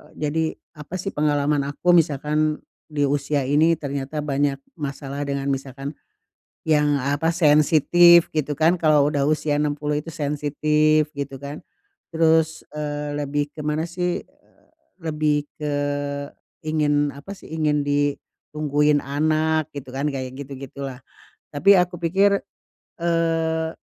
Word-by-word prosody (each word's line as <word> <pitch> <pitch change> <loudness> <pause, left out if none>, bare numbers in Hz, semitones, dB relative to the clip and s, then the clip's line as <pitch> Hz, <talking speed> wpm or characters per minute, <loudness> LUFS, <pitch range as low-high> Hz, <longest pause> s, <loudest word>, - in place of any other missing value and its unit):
jadi, 160 +1 -1 0.2
apa 150 +4 -7
sih 185 +2 -3
pengalaman 145 0 +1
aku, 145 +5 +1
misalkan, 155 -2 +1 0.2
di 150 -2 -1
usia 140 0 0
ini 150 +5 +3
ternyata 140 0 -4
banyak 140 -1 0 0.2
masalah 140 0 -4
dengan 140 0 -1
misalkan 135 +1 -5 0.7
yang, 150 -2 +3
apa, 145 +4 0
sensitif, 165 +2 +5
gitu 150 -2 -1
kan. 165 +4 +3
Kalau 155 -3 +4
udah 145 -1 +1
usia 150 -1 +1
60 150 0 -1
itu 150 - -11
sensitif, 150 +1 +1
gitu 140 -2 -5
kan. 140 +2 -7 0.6
Terus, 160 0 +2
eee, 150 -1 -4
lebih 145 0 -2
ke 155 - -13
mana 150 +1 -1
sih, 175 +1 -2
eee, - - -32 0.4
lebih 150 -2 0 0.2
ke, 150 -1 -2 0.9
ingin, 145 -2 +1
apa 145 +9 -9
sih, 195 - -15
ingin 150 -2 +1
ditungguin 145 +1 0
anak, 155 +2 +1
gitu 130 -2 -7
kan, 135 +3 -2
kayak 130 -3 -4
gitu-gitulah. 135 -1 -7 0.5
Tapi 180 +8 +5
aku 180 0 0
pikir, 195 +4 +2 0.6
eee, 165 -1 0
150 Hz, 125 wpm, -23 LUFS, 145-160 Hz, 0.9 s, sensitif